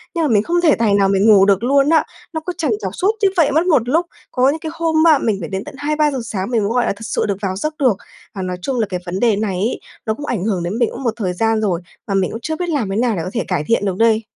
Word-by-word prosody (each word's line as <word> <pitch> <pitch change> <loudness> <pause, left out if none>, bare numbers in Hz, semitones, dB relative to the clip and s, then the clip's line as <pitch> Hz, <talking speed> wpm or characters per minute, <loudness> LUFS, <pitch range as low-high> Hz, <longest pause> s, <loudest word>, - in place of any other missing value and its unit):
nhưng 335 - +1
mà - - +2
mình 210 -3 +3
không 345 +5 0
thể 320 -4 +4
tài 225 -3 +1
nào 200 -1 +4
mình 195 +2 +3
ngủ 195 -2 +7
được 200 +2 +2
luôn 275 +3 +3
á, 325 -1 +4 0.3
nó 320 - -3
cứ 360 - -3
trằn 305 -8 0
trọc 190 - -3
suốt 390 +3 +2
như 395 - +5
vậy 315 -4 +4
mất 320 +4 +2
một 255 -9 +2
lúc. 330 +5 +2 0.3
Có 255 +1 +3
những 315 - -1
cái 315 0 -5
hôm, 325 -1 +2
a, 310 -3 +6
mình 220 -6 0
phải 165 - -6
đến 190 +1 -3
tận - - -10
2:00-3:00 295 -1 0
sáng 200 -2 -4
mình 230 -3 +2
mới, 200 - 0
gọi 245 0 +2
là, - - +1
thực 210 +3 -12
sự - - -1
được 200 -2 -1
vào 190 -2 -2
giấc 305 +11 -3
được. 250 -8 +3 0.4
Và 190 - -4
nói 185 -1 -3
chung 255 +4 -2
là 220 - +2
cái 180 -1 -3
vấn 180 +1 -3
đề 230 -3 +3
này 205 -2 -1
ấy 205 +7 -1 0.3
nó 220 - 0
cũng 290 +6 -7
ảnh 230 -10 -2
hưởng 195 -5 -1
đến 180 +6 -3
mình 235 - +2
cũng 270 - -8
một 235 - 0
thời 185 -5 -2
gian 225 +3 +1
rồi, 185 -5 0 0.3
mà 200 - -2
mình 190 -2 +1
cũng 225 - -5
chưa 315 +6 -3
biết 350 +2 -3
làm 275 -11 -1
thế 195 - -2
nào 230 -1 +1
để 170 - -2
có - - -4
thể 235 - -1
cải 180 -5 -1
thiện 230 -3 +1
được 190 -2 -1
đây. 225 0 +3
225 Hz, 325 wpm, -18 LUFS, 195-295 Hz, 0.4 s, ngủ